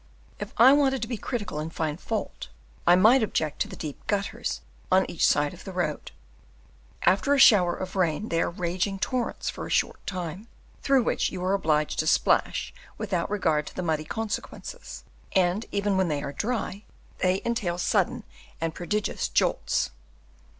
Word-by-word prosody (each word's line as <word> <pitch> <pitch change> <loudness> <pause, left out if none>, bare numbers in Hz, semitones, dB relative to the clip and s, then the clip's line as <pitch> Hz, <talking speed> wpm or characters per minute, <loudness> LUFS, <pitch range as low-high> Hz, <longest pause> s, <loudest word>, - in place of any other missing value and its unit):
If - - -5
I 260 +3 +8
wanted 270 -3 +2
to - - -3
be 240 - -3
critical 205 -8 -4
and 155 +2 -4
find 155 0 -3
fault, - - -4 0.4
I 175 - +8
might 220 +8 +6
object 160 -8 -1
to - - +1
the - - -9
deep 150 -3 -7
gutters 200 -1 -2 0.3
on 190 +1 +5
each 165 - -3
side 145 0 +3
of 180 - -12
the 190 - -7
road; 175 -5 -2 0.9
after 195 +11 +3
a - - +1
shower 185 -9 +7
of 185 0 -6
rain 180 +3 0
they 165 0 +1
are - - +1
raging 180 +3 -2
torrents 245 +4 -2
for - - -6
a - - -9
short - - 0
time, 185 +2 -5 0.3
through 270 -3 +3
which - - 0
you 180 -1 -5
are 190 - +2
obliged 155 -6 +1
to 155 - +1
splash - - +2 0.2
without 175 -3 -2
regard 160 -7 +1
to - - -9
the 185 - -3
muddy 155 -2 -1
consequences; 225 - -5 0.3
and 185 +3 +2
even 200 -1 0
when 190 -1 +2
they 150 -2 -1
are 140 - -5
dry, 215 - -3 0.4
they 185 +1 +1
entail 210 -7 -1
sudden 220 +6 +1 0.4
and 165 0 -2
prodigious 210 +5 -2
jolts. - - +1
185 Hz, 175 wpm, -26 LUFS, 165-215 Hz, 0.9 s, I